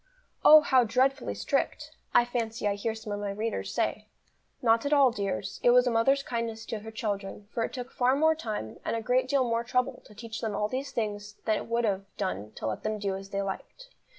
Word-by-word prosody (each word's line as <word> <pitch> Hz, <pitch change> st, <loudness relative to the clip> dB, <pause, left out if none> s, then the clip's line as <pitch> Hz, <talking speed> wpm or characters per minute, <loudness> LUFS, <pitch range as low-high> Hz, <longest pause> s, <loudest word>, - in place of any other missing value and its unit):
"Oh, 310 Hz, 0 st, +10 dB
how 260 Hz, -4 st, +4 dB
dreadfully 255 Hz, +4 st, +1 dB
strict!" -, -, -1 dB, 0.2 s
I 240 Hz, -, +5 dB
fancy 230 Hz, -2 st, -2 dB
I 205 Hz, -, +2 dB
hear 220 Hz, +2 st, -2 dB
some 220 Hz, -1 st, -6 dB
of 205 Hz, -, -3 dB
my 205 Hz, -1 st, -3 dB
readers 215 Hz, +3 st, -3 dB
say. -, -, -1 dB, 0.5 s
Not 230 Hz, -1 st, +3 dB
at 285 Hz, +1 st, +1 dB
all, 275 Hz, -3 st, +6 dB
dears, 195 Hz, -3 st, -3 dB
it -, -, +4 dB
was 250 Hz, +1 st, +6 dB
a 245 Hz, -, +2 dB
mother's 270 Hz, +5 st, +3 dB
kindness 230 Hz, -3 st, -3 dB
to 220 Hz, -1 st, -4 dB
her 220 Hz, +2 st, -9 dB
children; 205 Hz, -2 st, -4 dB
for 230 Hz, -, -1 dB
it -, -, -3 dB
took 250 Hz, 0 st, -6 dB
far 255 Hz, +1 st, +2 dB
more 315 Hz, +3 st, +4 dB
time, 215 Hz, -, -5 dB
and -, -, -1 dB
a 230 Hz, -, -2 dB
great 255 Hz, +3 st, +2 dB
deal 270 Hz, 0 st, +3 dB
more 230 Hz, -1 st, 0 dB
trouble 250 Hz, +1 st, -1 dB
to 210 Hz, -, -16 dB
teach 220 Hz, 0 st, -7 dB
them 220 Hz, -3 st, -2 dB
all 210 Hz, -, 0 dB
these 270 Hz, +3 st, -3 dB
things 210 Hz, -3 st, -3 dB
than 215 Hz, -1 st, +2 dB
it -, -, -6 dB
would 235 Hz, 0 st, +1 dB
have 195 Hz, -2 st, -1 dB
done 110 Hz, -, -3 dB
to -, -, -6 dB
let 110 Hz, -1 st, -2 dB
them 215 Hz, 0 st, -2 dB
do 200 Hz, -2 st, -2 dB
as 195 Hz, 0 st, -8 dB
they 200 Hz, 0 st, -2 dB
liked. -, -, -7 dB
225 Hz, 235 wpm, -28 LUFS, 205-250 Hz, 0.5 s, Oh